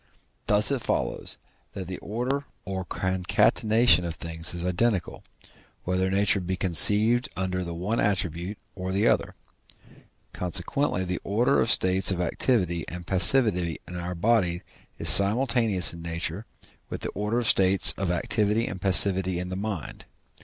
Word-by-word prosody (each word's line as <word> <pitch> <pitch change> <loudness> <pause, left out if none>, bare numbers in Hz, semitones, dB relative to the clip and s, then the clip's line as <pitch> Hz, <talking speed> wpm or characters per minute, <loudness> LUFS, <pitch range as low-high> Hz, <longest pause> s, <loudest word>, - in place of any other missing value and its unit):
Thus 105 +4 +2
it 135 -3 -2
follows - - -3 0.4
that 95 - -7
the 95 -1 -7
order 125 +7 -4 0.2
or 95 -1 -5
concatenation 95 +4 +1
of 85 -1 -5
things 80 0 0
is 85 0 -4
identical, 90 +1 -2 0.6
whether 90 +1 -1
nature 100 +1 +1
be 95 0 -4
conceived 105 +7 +4
under 90 -1 -3
the 85 -1 -7
one 100 +7 -3
attribute 95 0 -3 0.2
or 95 -1 -6
the 100 +4 0
other; - - 0 1.0
consequently 90 +4 -2
the 90 -1 -4
order 115 +7 +1
of 110 - -1
states 95 -3 +3
of 95 -2 -1
activity 90 -2 -1
and 90 0 -8
passivity 95 -2 +3
in 90 - -9
our 90 +1 -5
body 90 -3 0 0.3
is - - -2
simultaneous 110 -2 +3
in 85 - -10
nature 85 +4 -5 0.4
with - - -7
the - - -4
order 105 +3 -3
of 120 - -1
states 95 0 +4
of 95 -2 -4
activity 105 +5 -1
and 95 - -7
passivity 95 -1 +5
in 90 +1 -5
the 95 - -5
mind. 100 -5 -6
95 Hz, 150 wpm, -25 LUFS, 90-105 Hz, 1.0 s, passivity